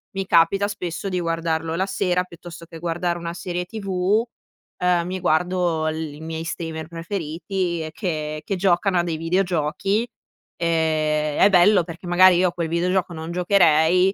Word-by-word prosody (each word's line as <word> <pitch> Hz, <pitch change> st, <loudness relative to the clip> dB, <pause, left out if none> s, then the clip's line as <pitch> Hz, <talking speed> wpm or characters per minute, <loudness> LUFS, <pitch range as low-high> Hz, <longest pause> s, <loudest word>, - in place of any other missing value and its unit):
mi 195 Hz, 0 st, -2 dB
capita 175 Hz, +4 st, +3 dB
spesso 185 Hz, -1 st, -4 dB
di 185 Hz, -1 st, -1 dB
guardarlo 165 Hz, -1 st, -1 dB
la 185 Hz, +3 st, 0 dB
sera, 180 Hz, -1 st, 0 dB
piuttosto 170 Hz, -1 st, -11 dB
che 165 Hz, 0 st, -11 dB
guardare 175 Hz, +1 st, -2 dB
una 170 Hz, 0 st, -5 dB
serie 180 Hz, 0 st, -4 dB
TV, 195 Hz, +1 st, 0 dB, 0.5 s
ehm, 180 Hz, -1 st, +1 dB
mi 185 Hz, +1 st, -3 dB
guardo 175 Hz, -1 st, +1 dB
l 155 Hz, -, -3 dB, 0.2 s
i -, -, -12 dB
miei 160 Hz, 0 st, -5 dB
streamer 160 Hz, -2 st, -5 dB
preferiti 170 Hz, +1 st, -3 dB
e 155 Hz, -, -6 dB
che 155 Hz, -5 st, -3 dB
che 195 Hz, -, -2 dB
giocano 185 Hz, +1 st, +2 dB
a -, -, +2 dB
dei 165 Hz, -2 st, -3 dB
videogiochi, 180 Hz, +5 st, 0 dB, 0.5 s
ehm, 155 Hz, -2 st, 0 dB
è 200 Hz, -, +7 dB
bello 185 Hz, +1 st, +5 dB
perché 170 Hz, +1 st, -9 dB
magari 180 Hz, 0 st, +6 dB
io 180 Hz, 0 st, +3 dB
a -, -, -10 dB
quel 170 Hz, -2 st, -2 dB
videogioco 180 Hz, +2 st, 0 dB
non 160 Hz, +1 st, -6 dB
giocherei 180 Hz, 0 st, +4 dB
175 Hz, 165 wpm, -22 LUFS, 165-185 Hz, 0.5 s, è